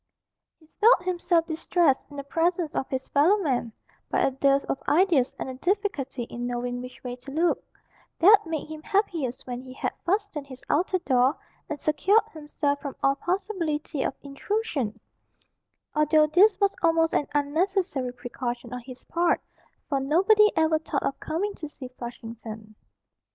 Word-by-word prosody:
He 320 - -23 0.2
felt 445 -4 +6
himself 350 -2 +1
distressed 320 -3 +1
in 290 - -11
the 280 - -4
presence 335 +2 0
of 265 - -2
his 265 -1 -3
fellow 320 +9 +4
men, 260 - -1 0.4
by - - +1
a - - +3
dearth 275 +1 +2
of - - -3
ideas 320 -6 +3
and - - -4
a 260 - -5
difficulty 295 - -1
in 240 +1 -5
knowing 245 0 -3
which 250 0 -10
way 245 -1 -4
to 255 +2 -12
look, 330 +5 +1 0.5
that 395 +1 +6
made 320 -3 -3
him 310 0 -8
happiest 325 - -1
when 245 -1 -5
he 255 0 -11
had - - -3
fastened 370 -6 -1
his 260 -2 -11
outer 365 +4 +2
door, 265 -4 +2 0.3
and 300 -2 -4
secured 370 +10 +3
himself 295 -2 -2
from 280 -2 -5
all 275 - +5
possibility 340 -4 -2
of - - -1
intrusion 280 - -2 0.9
although 305 0 +4
this 375 +7 +4
was 400 -1 +2
almost 325 -1 +3
an 290 - +1
unnecessary 295 -2 0
precaution 245 0 -5
on 250 - -4
his 255 +1 -11
part, 340 0 +1 0.5
for 275 - 0
nobody 390 +10 +4
ever 320 0 +3
thought 305 -2 -2
of 275 - -2
coming 400 +6 -2
to 305 -5 -8
see 265 -4 -9
Flushington. 230 -3 -9
300 Hz, 160 wpm, -26 LUFS, 260-350 Hz, 0.9 s, felt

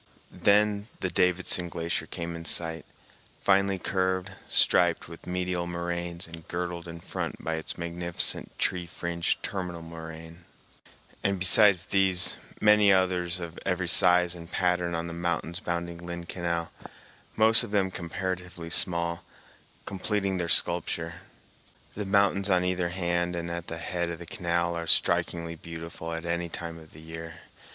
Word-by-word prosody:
Then 105 0 +3
the 95 - -2
Davidson 90 0 +1
Glacier 85 +1 -2
came 85 -1 -4
in 85 - -7
sight, 80 0 -2 0.5
finely 100 0 +3
curved, 95 +1 -1 0.2
striped 85 -1 +4
with 85 0 -11
medial 90 -1 -1
moraines, 85 0 -3
and 80 -1 -11
girdled 85 0 -4
in 85 0 -7
front - - -4
by 80 - -1
its 80 -1 -3
magnificent 85 0 -1
tree 90 -2 0
fringed 85 0 -2
terminal 90 -3 -4
moraine; 80 +1 -9 0.8
and 100 0 +2
besides 95 -1 +5
these 95 -2 +3 0.2
many 105 -1 +6
others 90 -2 +2
of 85 -1 -7
every 90 -1 -1
size 90 0 +5
and 85 -1 -9
pattern 90 -1 +1
on 85 0 -2
the 85 - -5
mountains 85 0 -2
bounding 85 -1 -3
Lynn 85 0 -6
Canal, 85 -1 -2 0.6
most 110 +2 +5
of 120 - -6
them 100 -2 +1
comparatively 90 -1 -4
small, 85 -1 +1 0.6
completing 100 0 -1
their 85 -2 -2
sculpture. 85 -1 +3 0.7
The 105 - -4
mountains 100 0 +3
on 90 -1 +3
either 90 -1 0
hand 85 -1 0
and 85 0 -3
at 85 0 -5
the 85 - -4
head 85 +1 -2
of 85 - -4
the 85 - -9
canal 85 -4 -1
are 85 0 -4
strikingly 85 0 +2
beautiful 85 0 -7
at 80 +1 -4
any 85 0 -1
time 85 0 -6
of 80 -1 -15
the 75 - -12
year. 80 +1 -8
85 Hz, 150 wpm, -28 LUFS, 85-90 Hz, 0.8 s, many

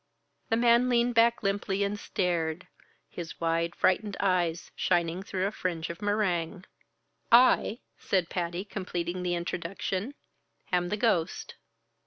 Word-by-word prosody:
The 225 - +3
man 235 +1 +4
leaned 240 0 +2
back 230 0 +3
limply 195 0 0
and 200 +1 -2
stared, 175 -3 -1 0.4
his 170 -2 -8
wide, 165 0 0
frightened 200 +2 +1
eyes 175 -4 0
shining 175 0 +1
through 190 -1 -2
a 200 - 0
fringe 170 -5 -3
of 170 - -11
meringue. 190 -3 -1 0.7
"I," 240 -1 +5 0.2
said 185 -3 0
Patty, 175 +2 -3
completing 180 -3 -4
the 175 -1 0
introduction, 185 +7 -3 0.6
"am 175 -1 +1
the 210 - -1
ghost." 190 -7 0
185 Hz, 130 wpm, -28 LUFS, 170-210 Hz, 0.7 s, I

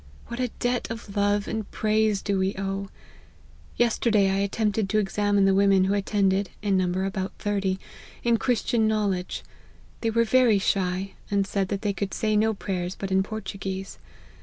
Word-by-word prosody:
What 235 - -5
a 250 - +1
debt 245 0 -1
of 225 -3 -7
love 205 0 +1
and 220 -2 -3
praise 215 -1 +1
do 200 -2 0
we 190 +1 0
owe! 195 0 -3 0.9
Yesterday 220 -4 +3
I 195 - +1
attempted 205 +1 0
to 215 - +1
examine 205 -1 +2
the 195 - +4
women 195 -1 +4
who 190 +1 +1
attended 200 -1 +1
(in 200 -2 +2
number 185 0 +1
about 190 0 -3
thirty,) 195 -2 -1 0.4
in 235 -1 +3
Christian 230 -2 +1
knowledge; 205 -4 -1 0.6
they 230 - +1
were 230 +1 +3
very 235 -2 +4
shy, 190 -1 0 0.2
and 200 -1 +1
said 195 0 -1
that 200 +2 -3
they 205 -1 +1
could 195 0 -3
say 215 -2 +1
no 220 +1 +2
prayers 185 -2 -3
but 195 -1 -5
in 190 0 +4
Portuguese. 195 -2 -5
200 Hz, 170 wpm, -26 LUFS, 195-215 Hz, 0.9 s, the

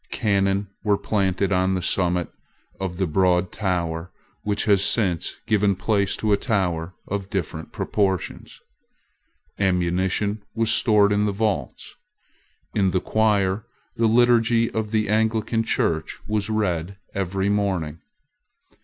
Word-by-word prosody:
Cannon 100 -2 +1 0.2
were 105 -2 +2
planted 100 -2 0
on 95 0 +2
the 90 - -2
summit 90 -2 0 0.5
of 95 -2 -4
the 95 - +1
broad 90 +1 +2
tower 85 -4 -2 0.3
which 105 0 -1
has 100 -3 +4
since 95 -7 +1
given 105 -2 +2
place 100 0 0
to 110 -1 +1
a - - +4
tower 90 -6 -1
of 100 -1 -4
different 80 -4 -4
proportions. 95 -5 -2 1.0
Ammunition 95 +2 0
was 115 -1 +2
stored 105 -3 +4
in 105 0 +2
the - - +1
vaults. 105 0 -2 0.8
In 100 -3 +2
the 95 - +1
choir 105 0 +1 0.3
the 115 - +2
liturgy 115 0 +3
of 110 -1 -2
the 110 0 0
Anglican 110 +1 +1
Church 80 -7 -1
was 105 0 -1
read 95 -4 -1 0.2
every 95 0 -1
morning. 95 -7 -1
100 Hz, 125 wpm, -23 LUFS, 90-110 Hz, 1.0 s, has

